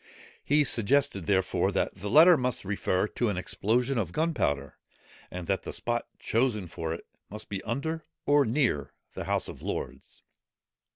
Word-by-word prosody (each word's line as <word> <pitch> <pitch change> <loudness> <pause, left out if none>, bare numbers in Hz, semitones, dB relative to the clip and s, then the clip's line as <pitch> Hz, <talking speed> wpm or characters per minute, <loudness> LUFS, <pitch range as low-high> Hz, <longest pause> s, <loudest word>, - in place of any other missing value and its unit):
He 145 +1 +3
suggested, 115 - +2
therefore, 95 -2 +1
that - - 0
the 100 +2 -6
letter 170 - +8
must 125 -6 -1
refer 95 0 0
to 120 - -1
an 100 - -2
explosion 110 +8 0
of 90 -6 -2
gunpowder, 90 - -1 0.5
and 90 -1 -6
that 95 +2 0
the - - -6
spot 120 0 -2
chosen 115 -4 0
for 80 -1 -5
it 80 - -6 0.2
must 105 +2 -8
be 100 -2 -4
under 155 +8 -3 0.2
or 145 0 +5
near 120 - 0 0.2
the - - -5
House - - 0
of - - -9
Lords. 65 +1 -6
110 Hz, 160 wpm, -28 LUFS, 95-135 Hz, 0.5 s, letter